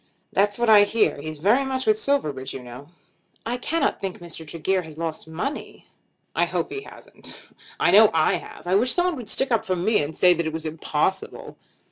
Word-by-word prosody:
"That's 205 +1 +2
what 240 0 0
I 210 -2 +8
hear. 205 -8 +1
He's 155 +1 -6
very 210 - +3
much 265 -1 -2
with 430 - +4
Silverbridge 150 - -1
you 130 - -7
know." 125 +3 -11 0.6
"I 240 +2 -2
cannot 325 +6 -1
think 195 -2 -4
that 175 - -12
Mr. 160 -1 -9
Tregear 185 +4 -1
has 160 -3 -12
lost 160 -1 -4
money." 180 - -5 0.5
"I - - +3
hope - - -3
he 410 - -4
hasn't. - - -12 0.4
I - - +3
know 210 +1 +8
I 160 -1 +2
have. - - -12
I 180 - 0
wish 230 +6 +3
someone 355 -1 +1
would 235 -5 -8
stick 265 +3 0
up 230 - +2
for 185 - -1
me, 210 +3 +2
and 150 +2 -5
say 180 -1 +6
that 170 -1 -2
it 160 - -4
was 160 0 -5
impossible." 155 +3 -2
190 Hz, 210 wpm, -24 LUFS, 160-240 Hz, 0.6 s, I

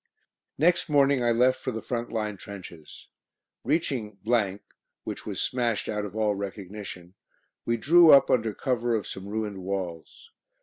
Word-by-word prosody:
Next 170 +3 +2
morning 140 -3 +3
I 120 - +2
left 125 +2 +3
for 130 - -4
the 110 - -4
front 120 0 -4
line 110 -2 -2
trenches. 90 -6 -11 0.6
Reaching, 130 -8 -1 0.9
which - - -7
was - - -4
smashed 120 -4 -1
out 105 -1 -2
of 105 - -8
all 110 -1 +1
recognition, 100 -2 -7 0.5
we 115 0 +1
drew 165 +8 +6
up 135 -1 +7
under 115 -2 +2
cover 120 0 -1
of 110 - -2
some 95 +1 -7
ruined 105 -2 -3
walls. 90 -4 -6
110 Hz, 145 wpm, -27 LUFS, 100-125 Hz, 0.9 s, up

